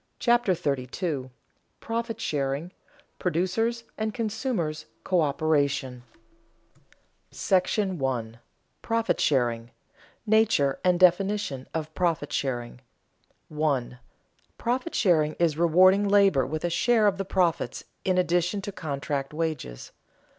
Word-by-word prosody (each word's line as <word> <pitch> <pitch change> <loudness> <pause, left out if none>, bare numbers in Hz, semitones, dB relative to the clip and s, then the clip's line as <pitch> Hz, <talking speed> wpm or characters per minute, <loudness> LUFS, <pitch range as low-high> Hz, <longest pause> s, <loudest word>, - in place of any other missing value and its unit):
CHAPTER 240 -6 +2
32 140 -2 -3 0.5
PROFIT 230 0 -3
SHARING, 140 +3 -2 0.5
PRODUCERS' 190 +8 0 0.2
AND 220 +1 -2
CONSUMERS' 215 - -2 0.2
COÖPERATION 145 -5 +1 1.3
§ 175 - 0
I. - - -22 0.4
PROFIT 230 0 0
SHARING 120 -5 +2
[Sidenote: 115 +1 -19 0.5
Nature 215 -11 +3
and 180 -1 +3
definition 185 -6 +2
of 155 -1 -4
profit 165 -5 -1
sharing] 120 -3 -3 0.7
1. 140 -5 -1 0.6
_Profit 255 +7 -2
sharing 155 -6 +3
is 165 -3 +1
rewarding 185 +4 +5
labor 195 -10 +4
with 155 +4 -3
a 175 - -1
share 220 +5 +3
of 195 -2 +2
the - - 0
profits 180 -3 0 0.2
in 185 -1 +1
addition 180 +2 +1
to 200 - -4
contract 145 -4 -4
wages. 155 - -4
170 Hz, 105 wpm, -26 LUFS, 140-200 Hz, 1.3 s, rewarding